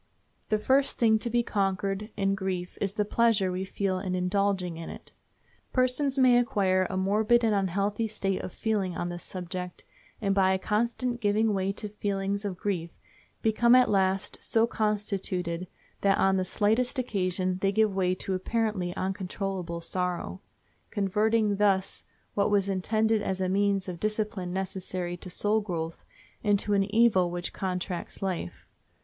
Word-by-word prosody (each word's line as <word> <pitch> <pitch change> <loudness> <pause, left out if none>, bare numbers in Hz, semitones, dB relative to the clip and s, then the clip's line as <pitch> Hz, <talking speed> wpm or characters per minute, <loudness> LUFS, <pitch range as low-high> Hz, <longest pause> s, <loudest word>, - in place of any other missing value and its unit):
The 215 - +3
first 265 +6 +2
thing 220 -2 +4
to 235 - -2
be 240 +1 +2
conquered 195 0 -1
in 195 -1 +2
grief 190 -2 -3
is 200 -1 0
the 210 0 0
pleasure 215 -4 +2
we 185 +1 -2
feel 190 -1 -1
in 185 -1 -2
indulging 185 -1 0
it. 165 - -9 0.6
Persons 255 +2 +2
may 255 -2 +6
acquire 190 -6 +2
a 185 - -2
morbid 215 +5 +3
and 220 -2 +3
unhealthy 200 +3 0
state 195 -3 -2
of - - -6
feeling 195 -5 -1
on 175 - -2
this 175 0 -6
subject, 180 0 -6 0.4
and 200 -3 +1
by 190 -1 +4
a - - +2
constant 235 +4 -1
giving 210 +1 +2
way 195 0 0
to 210 - -5
feelings 200 0 -2
of 190 -3 -3
grief 180 -4 -2 0.5
become 235 +2 +5
at 255 -3 +5
last 190 -1 +1
so 225 0 +2
constituted 195 -6 -2 0.3
that 195 -1 +3
on 195 0 +3
the 185 - 0
slightest 220 +8 +1
occasions 185 -6 0
they 195 0 +2
give 215 0 +2
way 185 -1 +1
to 190 - -3
apparently 190 -2 -1
uncontrollable 190 -2 -3
sorrow, 175 - -2 0.5
converting 210 +1 +1
thus 195 -2 +1 0.3
what 200 0 +2
was 200 -1 +2
intended 215 +3 +1
as 190 -2 -2
a 185 - 0
means 195 0 +1
of 175 -2 -5
discipline 210 -3 -1
necessary 185 -1 -3
to 180 +1 -10
soul 210 +4 +1
growth 165 -5 -4 0.4
into 205 0 +2
an 195 -1 +3
evil 205 -4 +3
which 175 0 -4
contracts 180 -1 -4
life. 180 - -4
195 Hz, 155 wpm, -28 LUFS, 185-215 Hz, 0.6 s, may